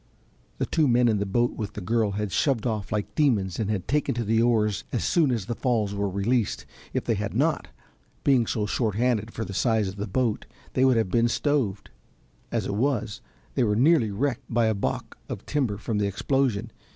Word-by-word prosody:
The - - 0
two 155 -3 +2
men 120 0 +4
in 110 -3 +2
the 100 - -1
boat 120 +5 +1
with 105 -2 -5
the - - -5
girl 110 +1 0
had 105 0 -2
shoved 130 -3 +1
off 110 -3 -2
like 105 -2 -2
demons 110 - +1
and 105 -3 -2
taken 150 -3 +1
to 120 - -1
the 110 +1 +2
oars 110 -4 +2
as 120 - -1
soon 165 -6 +3
as 115 -6 -1
the 120 - -2
falls 115 -5 0
were 100 0 -1
released. 105 +4 0 0.3
If - - -1
they - - +1
had - - -3
not, - - +1 0.6
being 125 -5 +3
so 105 -2 -1
short 110 -1 -1
handed 115 -2 +1
for 110 - -4
the 95 - -7
size 110 -1 +2
of 95 +1 -6
the 100 - -3
boat, 115 +2 -1 0.3
they 130 - +3
would 130 -3 +4
have 110 -5 0
been 115 0 +3
stoved; 120 -6 -1 0.6
as - - -1
it - - -2
was 115 -2 -1 0.3
they 130 - +2
were 105 -2 +2
nearly 135 -1 +4
wrecked 125 +4 -2
by 115 0 +3
a 110 - +2
balk 100 - -3
of - - -6
timber 130 -9 0
from 105 0 -2
the 100 - +1
explosion. 115 +1 0
115 Hz, 210 wpm, -26 LUFS, 105-125 Hz, 0.6 s, men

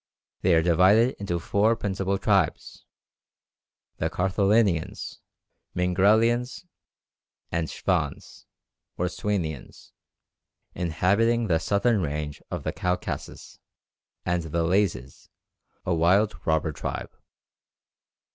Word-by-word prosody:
They 90 -2 +4
are 80 - +3
divided 95 +9 +4
into 95 -4 -2
four 100 +6 +2
principal 100 -2 -2
tribes 95 -4 0 1.1
the - - -1
Karthalinians, 95 -1 0 0.6
Mingrelians, 110 - +2 0.9
and 80 -1 -1
Shvans - - -3 0.5
(or 90 - 0
Swanians), 85 -8 -4 0.8
inhabiting 100 +7 +1
the 85 -6 +2
southern 100 +4 +1
range 75 -2 -4
of - - -4
the - - -2
Caucasus, 90 0 -4 0.7
and 90 -1 0
the 85 +1 -2
Lazes, 85 -8 -1 0.6
a 90 - +1
wild 95 +6 +3
robber 80 0 +1
tribe. 70 - -5
95 Hz, 90 wpm, -26 LUFS, 85-105 Hz, 1.1 s, They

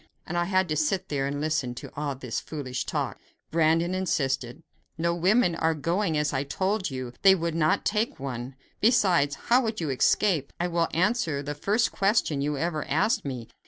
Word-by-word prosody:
And 175 - -5
I 175 0 +1
had 185 0 +2
to 155 - 0
sit 155 +5 0
there 140 -2 -1
and 145 +1 -3
listen 150 -5 -1
to - - -9
all 145 -1 -2
this 125 -3 -4
foolish 130 -5 -5
talk! - - -2 0.3
Brandon 165 +2 +2
insisted: 135 -6 -1 0.3
"But 165 - -4
no 170 0 +2
women 180 +3 +3
are 165 0 +1
going; 165 +2 0
as 150 -1 0
I 135 0 0
told 190 +8 -1
you, 130 -2 -5
they 190 0 +7
would 170 -2 -2
not 160 -1 +1
take 210 +2 0
one; 130 -1 -5 0.2
besides, 185 - +3
how 245 +2 +2
could 225 -3 -2
you 155 -5 -1
escape? 155 +3 +2
I 175 +1 0
will 170 -1 +1
answer 170 -5 0
the 145 +1 -4
first 210 +10 +1
question 195 -8 +1
you 145 0 -1
ever 155 0 -1
asked 160 - +1
me. 125 -5 -5
160 Hz, 195 wpm, -27 LUFS, 140-185 Hz, 0.3 s, they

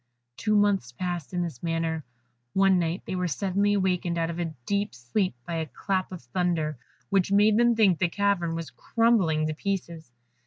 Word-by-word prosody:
Two 215 - 0
months 205 - +2
passed 175 +3 -4
in 180 -1 -1
this 160 -8 -6
manner. 165 -1 -1 0.5
One 195 -1 +4
night 170 +2 -1
they 190 - -3
were 180 0 0
suddenly 200 +5 +1
awakened 180 -3 0
out 165 0 0
of 170 - -6
a 175 - 0 0.2
deep 200 -8 -1
sleep 125 - -1
by 170 -1 -3
a 160 -1 -2
clap 190 +1 -2
of 180 -6 -8
thunder 155 +1 -1 0.3
which 195 -1 +2
made 210 +1 +5
them 240 0 +4
think 195 -7 +4
the 175 - +2
cavern 185 -4 0
was 165 -5 -5
crumbling 180 - +2
to 155 - -1
pieces. 170 -3 -4
180 Hz, 185 wpm, -27 LUFS, 165-200 Hz, 0.5 s, made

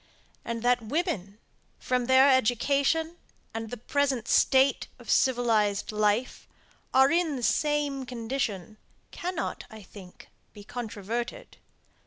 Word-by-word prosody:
And 230 0 -4
that 245 0 +3
women, 225 - -3 0.4
from 250 -1 -1
their 260 +1 +6
education 280 +6 +2 0.4
and 225 0 -5
the 245 - -6
present 265 -1 -1
state 270 +1 +3
of - - -6
civilized 225 -6 +2
life, 215 +3 0 0.4
are 265 +1 +5
in 335 -3 +1
the 250 - -5
same 290 -1 0
condition, 225 -5 -4 0.3
cannot, 355 -1 -4
I 220 -3 -11
think, 185 -2 -14 0.2
be 205 - -12
controverted. 230 +1 -5
245 Hz, 115 wpm, -27 LUFS, 220-275 Hz, 0.4 s, their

